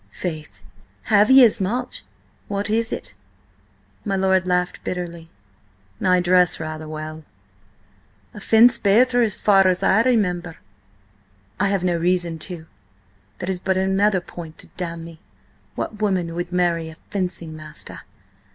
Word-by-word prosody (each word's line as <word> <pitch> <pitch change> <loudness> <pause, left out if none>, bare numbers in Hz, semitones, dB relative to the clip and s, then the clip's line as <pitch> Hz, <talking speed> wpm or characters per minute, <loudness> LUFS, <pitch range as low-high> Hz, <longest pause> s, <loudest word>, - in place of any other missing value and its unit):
"Faith, 155 -4 -6 0.5
have 210 +2 +6
ye 265 -1 +9
as 215 - +1
much? 245 +7 -3 0.4
What 200 +1 -2
is 225 +1 0
it?" - - -5 0.9
My 195 - -1
lord 190 -1 +2
laughed 180 0 -1
bitterly. 170 -2 -5 0.7
"I 180 -1 +4
dress 180 0 +3
rather 155 0 -6
well." 155 0 -7 1.1
"And 210 - -10
fence 235 +4 +5
better, 245 +5 +4
as 220 -4 +1
far 195 -2 +5
as 185 -1 +1
I 205 +4 +4
remember." 180 -9 0 1.0
"I 200 - +2
have 195 -2 0
reason 175 -1 0
to. 170 -3 -7 0.7
That 180 - -5
is 185 -2 -2
but 190 +1 0
another 190 +1 +2
point 165 -2 -10
to - - -13
damn 170 -2 -5
me. 165 -1 -12 0.6
What 215 -1 -5
woman 185 -5 0
would 175 +1 -4
marry 170 -2 0
a 160 - -11 0.2
fencing 180 -5 -4
master? 155 -1 -9
180 Hz, 140 wpm, -22 LUFS, 170-200 Hz, 1.1 s, ye